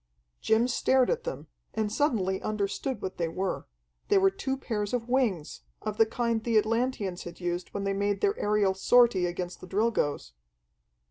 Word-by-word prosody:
Jim 225 +2 +3
stared 260 0 +3
at 485 0 -2
them, - - -5 0.3
and 215 -1 0
suddenly 205 -10 +1
understood 215 +3 -2
what 190 - -4
they 170 - 0
were. 185 +3 -3 0.4
They - - +4
were 195 0 +5
two 265 +7 -3
pairs 210 -5 -3
of 235 -1 -3
wings, 235 - 0 0.2
of 215 -1 -3
the 225 - +6
kind 230 -1 -1
the 230 -2 +2
Atlanteans 220 -4 0
had 170 0 -9
used 175 0 -3
when 200 - -4
they 195 0 0
made 200 +1 0
their 405 0 +2
aerial 205 -2 +2
sortie 200 -2 +4
against 175 0 -5
the - - -9
Drilgoes. 185 - 0
210 Hz, 175 wpm, -28 LUFS, 190-240 Hz, 0.4 s, the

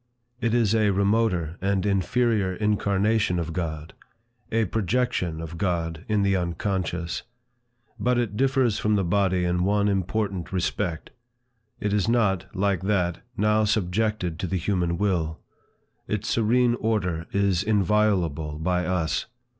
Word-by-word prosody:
It 115 -2 +1
is 115 -3 +3
a 110 -2 +3
remoter 100 -4 +1
and 100 0 0
inferior 100 0 +1
incarnation 105 -1 +1
of 85 -1 -3
God, 80 -2 -4 0.6
a 115 0 +2
projection 105 -6 -1
of 80 0 -7
God 85 -2 -2
in 105 -2 +1
the 100 -1 +2
unconscious. 90 -1 -2 0.8
But 125 0 +2
it 115 -4 -1
differs 130 -3 +2
from 105 0 +1
the 100 - +1
body 95 0 +1
in 90 0 +1
one 100 +2 +2
important 95 -1 -1
respect. 90 -2 -2 0.7
It 105 -1 -1
is 105 +1 +1
not, 105 -6 +1
like 100 -2 +1
that, 95 -3 0 0.2
now 105 +1 +3
subjected 105 -3 0
to 95 - -2
the 95 - -1
human 85 -2 0
will. 85 -5 0 0.7
Its 105 +2 -2
serene 120 +2 +3
order 90 -7 -1
is 100 -3 +2
inviolable 95 -7 +1
by 90 +3 0
us. 85 -5 -1
100 Hz, 135 wpm, -25 LUFS, 90-105 Hz, 0.8 s, is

